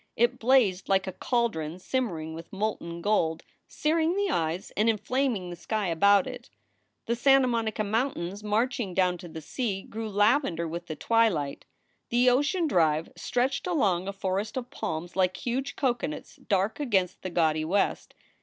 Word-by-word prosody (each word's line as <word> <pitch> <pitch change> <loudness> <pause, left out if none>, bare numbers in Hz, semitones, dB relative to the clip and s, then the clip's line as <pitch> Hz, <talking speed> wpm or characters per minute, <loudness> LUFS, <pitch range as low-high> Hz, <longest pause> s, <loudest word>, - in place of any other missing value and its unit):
It 240 +1 +2
blazed 230 -7 +3
like 195 0 +3
a 190 - -3
caldron 180 -12 -1
simmering 185 -8 -2
with 165 +1 -9
molten 190 -5 -3
gold, 165 -6 +1 0.2
searing 320 +3 +1
the 405 -1 +1
eyes 165 +2 -1
and 215 +2 +3
inflaming 225 -4 0
the - - -6
sky 205 +2 -2
about 200 +4 +4
it. 250 -1 -8 0.6
The 235 - 0
Santa 270 +2 +5
Monica 230 -3 -1
Mountains 205 -3 -2
marching 220 -1 0
down 180 -2 +2
to 175 - -9
the 160 -1 -8
sea 195 - -3
grew 220 0 -6
lavender 205 - +2
with 170 +2 -6
the 155 - -4
twilight. 195 -10 +1 0.4
The 245 +1 +4
Ocean 290 +8 +2
Drive 160 - +2
stretched 265 +6 -1
along 195 - +1
a - - -1
forest 195 +4 -2
of 250 0 -5
palms 170 - -4
like 185 -1 +1
huge 255 +3 -3
coconuts 240 - -2
dark 195 +4 0
against 190 -10 0
the 185 - -4
gaudy 160 -3 +1
west. 190 +6 0
205 Hz, 160 wpm, -27 LUFS, 175-245 Hz, 0.6 s, Santa